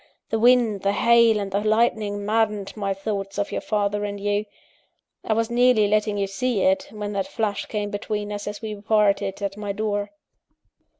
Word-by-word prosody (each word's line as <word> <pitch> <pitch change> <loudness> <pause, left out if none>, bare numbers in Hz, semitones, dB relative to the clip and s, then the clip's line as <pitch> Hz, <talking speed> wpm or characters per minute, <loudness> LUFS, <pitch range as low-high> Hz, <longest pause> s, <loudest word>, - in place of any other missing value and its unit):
The 225 - +1
wind, 235 -4 +4
the 200 +1 +1
hail, 235 0 +4
and 200 -1 -4
the 200 +1 0
lightning 215 -2 +1
maddened 210 -2 0
my 200 -2 -2
thoughts 195 0 -4
of 205 - -1
your - - -2
father 205 -1 -1
and 205 0 -4
you 205 +1 0 0.8
I 220 - 0
was 225 +1 0
nearly 240 -3 +4
letting 210 0 +1
you 200 - +1
see 200 +3 -1
it, 285 0 +2
when 210 -4 -5
that 195 -1 -2
flash 205 -2 -2
came 210 -1 -3
between 210 0 -3
us 205 0 -5
as 205 +1 -6
we 215 -1 -4
parted 200 -1 +1
at 200 0 -3
my 205 -1 -3
door. 205 -1 -2
210 Hz, 185 wpm, -23 LUFS, 200-220 Hz, 0.8 s, wind